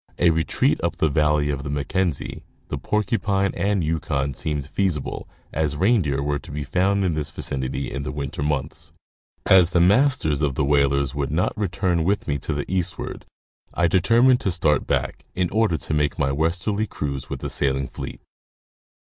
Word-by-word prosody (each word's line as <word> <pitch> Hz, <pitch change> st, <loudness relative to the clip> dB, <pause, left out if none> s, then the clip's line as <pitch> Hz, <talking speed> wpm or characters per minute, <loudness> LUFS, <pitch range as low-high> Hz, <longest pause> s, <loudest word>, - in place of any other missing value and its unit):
A 85 Hz, -1 st, +4 dB
retreat 80 Hz, 0 st, +1 dB
up -, -, 0 dB
the 80 Hz, -, +1 dB
valley 75 Hz, 0 st, +2 dB
of 70 Hz, -1 st, -3 dB
the 70 Hz, -, -6 dB
Mackenzie, 80 Hz, +3 st, -2 dB, 0.3 s
the -, -, -3 dB
Porcupine, 100 Hz, -2 st, 0 dB
and 100 Hz, 0 st, 0 dB
Yukon, 75 Hz, -3 st, -1 dB
seemed 75 Hz, 0 st, -3 dB
feasible, 80 Hz, -1 st, -2 dB, 0.2 s
as 75 Hz, -2 st, -1 dB
reindeer 85 Hz, -, +2 dB
were 75 Hz, 0 st, -1 dB
to -, -, -13 dB
be 75 Hz, +1 st, -4 dB
found 95 Hz, +7 st, +1 dB
in 85 Hz, -, +1 dB
this 75 Hz, -2 st, -2 dB
vicinity 65 Hz, 0 st, -3 dB
in 70 Hz, -, -3 dB
the 70 Hz, -, -4 dB
winter 70 Hz, +1 st, -4 dB
months. 75 Hz, +3 st, -3 dB, 0.5 s
As 90 Hz, -3 st, +6 dB
the 90 Hz, -, +2 dB
masters 95 Hz, -, +3 dB
of 70 Hz, -4 st, 0 dB
the 70 Hz, -, +1 dB
whalers 70 Hz, -1 st, +2 dB
would 70 Hz, -2 st, -2 dB
not 80 Hz, +5 st, 0 dB
return 95 Hz, -4 st, 0 dB
with 100 Hz, +5 st, 0 dB
me 70 Hz, 0 st, -1 dB
to 70 Hz, -, -4 dB
the 75 Hz, -1 st, -2 dB
eastward, 90 Hz, -2 st, -3 dB, 0.5 s
I 85 Hz, -, +3 dB
determined 115 Hz, +9 st, +4 dB
to -, -, 0 dB
start 85 Hz, -4 st, +1 dB
back, -, -, -1 dB
in 90 Hz, -1 st, 0 dB
order 110 Hz, -6 st, +2 dB
to 75 Hz, -, -4 dB
make 75 Hz, -1 st, +1 dB
my 70 Hz, 0 st, +1 dB
westerly 90 Hz, +8 st, 0 dB
cruise 70 Hz, -6 st, -4 dB
with -, -, -5 dB
the -, -, -3 dB
sailing 70 Hz, -1 st, 0 dB
fleet. -, -, -8 dB
80 Hz, 180 wpm, -23 LUFS, 70-95 Hz, 0.5 s, As